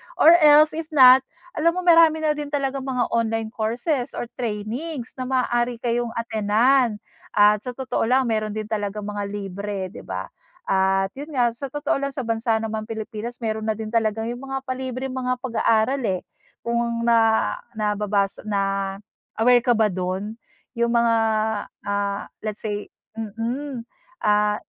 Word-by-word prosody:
Or 325 - +7
else 305 0 +7
if 320 0 -5
not 260 -4 +8 0.3
alam 335 +2 +1
mo 365 - -2
marami 330 -2 +5
na 305 - +3
din 295 -1 -3
talagang 275 -2 -2
mga 250 -2 -1
online 225 -1 0
courses 240 +5 -2
or - - -3 0.2
trainings 240 +5 -4
na 255 - -3
maaari 245 -2 0
kayong 240 -1 -1
attenan. 230 +2 +2 0.4
At 210 0 +5
sa 250 - -4
totoo 260 -3 -1
lang 260 +2 +3
meron 215 -2 -1
din 215 - -2
talagang 210 -1 -2
mga 205 -1 -4
libre 200 -1 -5
di - - -10
ba? - - -6 0.3
At 195 0 +1
yun 295 0 -7
nga 240 -2 +3
sa 255 +4 -6
totoo 290 +2 -1
lang 275 -1 -3
sa 265 - -3
bansa 225 0 0
ng 220 0 -2
mga 215 -1 -4
Pilipinas 225 +1 -5
meron 220 0 -2
na 220 - +1
din 220 0 -6
talagang 225 0 0
yung 250 +3 -8
mga 270 0 -4
palibreng 260 0 -4
mga 255 -1 -1
pag-aaral 230 +1 +1
eh. 185 -2 -1 0.4
Kung 235 0 -1
na 225 -1 +3 0.2
nababasa 210 -1 -1
na 195 -1 -1 0.5
aware 245 +1 +6
ka 240 0 +2
ba 215 -2 +2
dun? 190 +5 -4 0.3
Yung 235 -1 0
mga 235 -1 +4 0.7
ah, 200 0 -2
let's 215 0 -5
say, 205 -1 -3 0.3
mm, 230 +4 -4 0.4
ah, 210 0 +3
230 Hz, 160 wpm, -23 LUFS, 210-260 Hz, 0.7 s, not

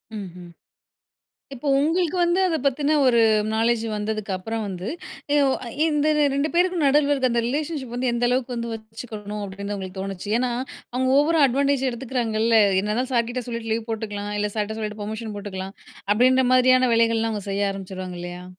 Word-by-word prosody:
ம்ஹ்ம். 180 -3 -8 1.0
இப்போ 270 +3 -6
உங்களுக்கு 335 +3 +1
வந்து 345 +2 +2
அத 325 -2 0
பத்தின 290 +3 +2
ஒரு 235 -2 +4 0.3
நாலேட்ஜ் 230 +1 +1
வந்ததுக்கு 210 -1 -3
அப்புறம் 220 +4 -4
வந்து, 185 +1 -5 0.5
அ - - +4
ஒ - - +2 0.4
இந்த 300 -1 +1 0.3
2 290 +3 0
பேருக்கும் 355 -2 +2
நடுவுல 290 +1 +4
இருக்க 260 -3 +1
அந்த 235 0 +1
ரிலேஷன்ஷிப் 285 -2 -3
வந்து 250 0 0
எந்த 240 +1 +1
அளவுக்கு 250 0 -1
வந்து 235 0 -4
வச்சுக்கணும், 215 -2 -7
அப்டின்னு 200 +1 -5
உங்களுக்கு 190 -1 -7
தோணுச்சு. 195 +1 -5
ஏன்னா, 250 -1 0 0.4
அவங்க 260 +1 +1
ஓவரா 310 +1 +4
அட்வான்டேஜ் 275 +1 +1
எடுத்துக்கிறாங்கல்ல 230 -3 +1 0.2
என்னதான் 240 +6 -2
சார்கிட்ட 240 +1 0
சொல்லிட்டு 230 -2 -4
லீவ் 225 0 -3
போட்டுக்குலாம், 210 -2 -4
இல்ல 210 0 0
சார்ட்ட 215 +1 -2
சொல்லிட்டு 210 -1 -5
பெர்மிஷன் 215 0 -5
போட்டுக்கலாம் 195 -1 -6 0.4
அப்டின்ற 255 +3 +4
மாதிரியான 255 0 +5
வேலைகள்லாம் 230 -1 +2
அவங்க 205 -1 -5
செய்ய 200 0 0
ஆரம்பிச்சுருவாங்க 185 -2 -7
இல்லயா? 175 0 -7
230 Hz, 160 wpm, -23 LUFS, 205-260 Hz, 1.0 s, மாதிரியான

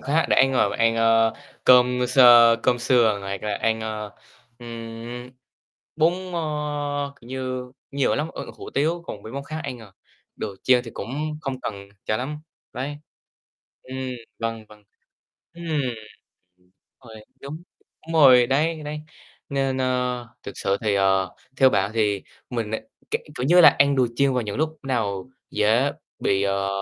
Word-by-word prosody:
khác 150 +5 +1
để - - +3
ăn, 135 0 +5
à, - - +4
ăn, 115 0 +3
ờ, 115 0 +3 0.3
cơm 125 0 +5
sơ 120 -2 +7
cơm 125 -1 +2
sườn 120 -4 +3
hoặc 95 0 -5
là 105 -1 -2
ăn, 110 +2 0
ờ, 110 -1 -5 0.5
ừm, 115 +1 -8 0.7
bún, 160 +2 +4 0.2
ơ, 145 -3 -2
kiểu 120 - -15
như, 130 -1 -4 0.2
nhiều 140 -1 +1
lắm, 150 +3 -1
ơ, - - -6
hủ - - -9
tiếu, 165 +5 0
còn 100 - -7
mấy 110 - -9
món 140 +1 -5
khác 155 +2 -5
ăn, 125 - -5
à, 110 -4 -14 0.4
đồ 105 -2 -5
chiên 125 -1 +4
thì 115 - -8
cũng 100 - -6 0.3
không 135 -4 -4
cần 100 -4 -6 0.2
cho 110 - 0
lắm, 140 +6 -4 0.3
đấy. 140 +3 -4 0.9
Ừm, 130 +1 -8 0.4
vâng, 115 -1 -3
vâng. 105 -1 -17 0.7
Ừm, 170 0 -10 0.9
đúng 90 0 -32 0.3
rồi, 110 -2 -12 0.2
đúng, 150 +4 -8 0.4
đúng 165 - -6
rồi 130 -6 +7
đấy. 155 +5 +1
Đấy, 150 +1 -5 0.5
nên, 135 -2 -1
ơ, 125 -2 -1
thực 100 - -7
sự 95 - +1
thì, 105 -2 +1
ờ, 95 -1 +2 0.2
theo 130 -1 +6
bạn 100 -2 +1
thì 105 -3 +1 0.3
mình, 115 -4 -3
ơ, 110 - -1 0.3
k - - -5 0.2
kiểu 125 - -1
như 175 +4 +6
là, - - +10
ăn 140 0 +4
đồ 130 -2 +4
chiên 140 0 +3
vào 125 - +1
những 105 -2 -5
lúc 155 +2 -1
nào 110 -5 -2 0.2
dễ 115 +7 +2 0.3
bị, 95 0 +1
ờ, 100 0 0
125 Hz, 170 wpm, -24 LUFS, 110-140 Hz, 0.9 s, là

